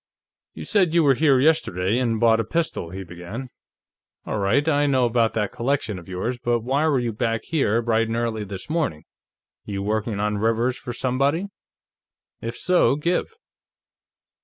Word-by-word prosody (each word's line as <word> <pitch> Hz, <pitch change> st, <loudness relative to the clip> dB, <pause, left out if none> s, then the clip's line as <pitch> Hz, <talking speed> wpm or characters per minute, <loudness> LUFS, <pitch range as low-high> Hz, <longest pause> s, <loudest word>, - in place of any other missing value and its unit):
"You -, -, -7 dB
said 185 Hz, -6 st, +2 dB
you 170 Hz, -, +5 dB
were 140 Hz, -2 st, +5 dB
here 140 Hz, -1 st, +3 dB
yesterday, 120 Hz, -, +2 dB
and 115 Hz, -3 st, 0 dB
bought 115 Hz, 0 st, +4 dB
a -, -, +1 dB
pistol," 160 Hz, -, -2 dB
he 95 Hz, +2 st, -6 dB
began. 90 Hz, +9 st, -8 dB, 0.7 s
"All 110 Hz, -, -2 dB
right; 120 Hz, +10 st, +2 dB
I 145 Hz, -2 st, +3 dB
know 130 Hz, -3 st, +3 dB
about 115 Hz, -1 st, +1 dB
that 105 Hz, -3 st, 0 dB
collection 115 Hz, -6 st, -1 dB
of 85 Hz, -, -14 dB
yours. 115 Hz, +7 st, -3 dB
But 120 Hz, -1 st, 0 dB
why 135 Hz, +6 st, +1 dB
were 145 Hz, -3 st, +2 dB
you 120 Hz, -2 st, -1 dB
back 115 Hz, 0 st, -1 dB
here 120 Hz, -8 st, +1 dB
bright 115 Hz, 0 st, +1 dB
and 115 Hz, -, -2 dB
early 115 Hz, -2 st, -1 dB
this 95 Hz, -2 st, -7 dB
morning? 150 Hz, -, -1 dB, 0.6 s
You 100 Hz, -1 st, -4 dB
working 105 Hz, 0 st, -1 dB
on 105 Hz, 0 st, 0 dB
Rivers 115 Hz, +3 st, +1 dB
for 125 Hz, -, -7 dB
somebody? 140 Hz, +10 st, 0 dB, 0.9 s
If 115 Hz, +1 st, -5 dB
so, 180 Hz, -6 st, +3 dB
give." 170 Hz, +5 st, 0 dB
120 Hz, 170 wpm, -23 LUFS, 105-140 Hz, 0.9 s, you